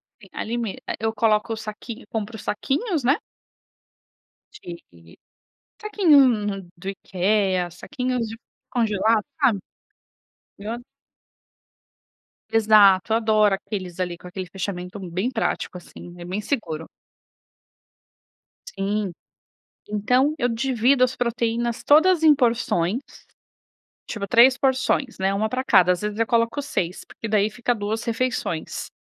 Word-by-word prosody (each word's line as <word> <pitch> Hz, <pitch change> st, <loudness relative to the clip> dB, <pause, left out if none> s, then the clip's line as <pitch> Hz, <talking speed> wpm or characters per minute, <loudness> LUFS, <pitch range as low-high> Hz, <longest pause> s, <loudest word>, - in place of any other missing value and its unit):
É. 205 Hz, -, -21 dB
Ali 235 Hz, +2 st, -3 dB
me, 225 Hz, -5 st, -3 dB, 0.2 s
eu 220 Hz, 0 st, 0 dB
coloco 215 Hz, 0 st, +1 dB
o -, -, -5 dB
saquinho 220 Hz, +3 st, -8 dB
compro 220 Hz, 0 st, -4 dB
os 220 Hz, -, -9 dB
saquinhos, 295 Hz, -, -1 dB
né? 275 Hz, +6 st, +3 dB, 1.5 s
De 85 Hz, -, -12 dB, 0.6 s
saquinhos 265 Hz, -, +3 dB
do 190 Hz, +3 st, -8 dB
IKEA, 190 Hz, -1 st, 0 dB
saquinhos 250 Hz, -, -3 dB
de 225 Hz, -, -7 dB, 0.3 s
congelado, 220 Hz, -2 st, +1 dB, 0.2 s
sabe? 235 Hz, -8 st, +3 dB, 1.0 s
Eu 210 Hz, +3 st, -5 dB
a 235 Hz, -, -4 dB, 1.7 s
Exato. 215 Hz, -2 st, +5 dB
Adoro 215 Hz, -3 st, +3 dB
aqueles 190 Hz, -3 st, -6 dB
ali, 175 Hz, -1 st, -2 dB
com -, -, -14 dB
aquele 185 Hz, +1 st, -6 dB
fechamento 180 Hz, +1 st, -5 dB
bem 185 Hz, +5 st, -3 dB
prático, 225 Hz, -6 st, -2 dB
assim. 175 Hz, 0 st, -12 dB
É 175 Hz, -, -8 dB
bem 185 Hz, +4 st, -3 dB
seguro. 175 Hz, -, -3 dB, 1.9 s
Sim. 200 Hz, -1 st, -1 dB, 0.8 s
Então 250 Hz, +8 st, +2 dB
eu 245 Hz, -4 st, +1 dB
divido 250 Hz, +2 st, +2 dB
as 255 Hz, 0 st, +1 dB
proteínas 235 Hz, -1 st, -1 dB
todas 320 Hz, +3 st, +5 dB
em 310 Hz, -, +8 dB
porções. 230 Hz, -, +1 dB, 1.1 s
Tipo 205 Hz, -3 st, -4 dB
3 250 Hz, +3 st, +6 dB
porções, 265 Hz, -1 st, 0 dB
né, 190 Hz, +1 st, +1 dB
uma 215 Hz, +2 st, 0 dB
pra 255 Hz, +3 st, -2 dB
cada 185 Hz, -4 st, +5 dB
às 180 Hz, -, 0 dB
vezes 210 Hz, 0 st, -3 dB
eu 230 Hz, -, +3 dB
coloco 230 Hz, +4 st, +1 dB
6, 180 Hz, -10 st, -3 dB
porque 225 Hz, -, -8 dB
daí 210 Hz, -1 st, +2 dB
fica 240 Hz, +2 st, -1 dB
2 215 Hz, +2 st, -3 dB
refeições. 230 Hz, -8 st, -2 dB
220 Hz, 125 wpm, -23 LUFS, 195-245 Hz, 1.9 s, em